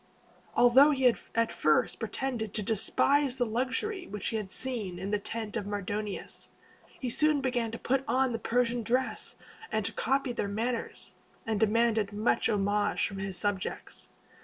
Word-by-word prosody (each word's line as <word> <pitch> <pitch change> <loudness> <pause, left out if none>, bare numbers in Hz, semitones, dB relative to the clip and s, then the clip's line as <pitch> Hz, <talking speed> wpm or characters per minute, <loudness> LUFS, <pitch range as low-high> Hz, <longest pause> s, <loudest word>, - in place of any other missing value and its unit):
Although 255 +4 +7
he 270 -3 0
had 245 -2 +5 0.2
at 230 0 +2
first 155 0 +2
pretended 225 -1 -3
to 215 - -1
despise 265 +6 +2
the 245 - +2
luxury 260 - -2
which 210 0 -3
he 225 - -3
had 210 -3 -3
seen 215 -6 -2
in 190 +3 -4
the 210 - +1
tent 220 +1 -5
of 205 - -3
Mardonius, 205 0 -4 0.5
he 260 - -3
soon 305 +3 +3
began 250 -4 0
to 230 - -5
put 270 +3 0
on 260 -1 +2
the 230 - -2
Persian 240 0 +1
dress 255 +4 -1 0.4
and 215 -2 0
to 225 - -1
copy 270 +1 0
their 205 - -2
manners, 230 +4 -3 0.3
and 220 -2 -1
demanded 220 -1 +2
much 210 +3 +1
homage 205 0 +1
from 195 - -7
his 195 -1 -3
subjects. 195 0 -3
230 Hz, 165 wpm, -29 LUFS, 205-255 Hz, 0.5 s, Although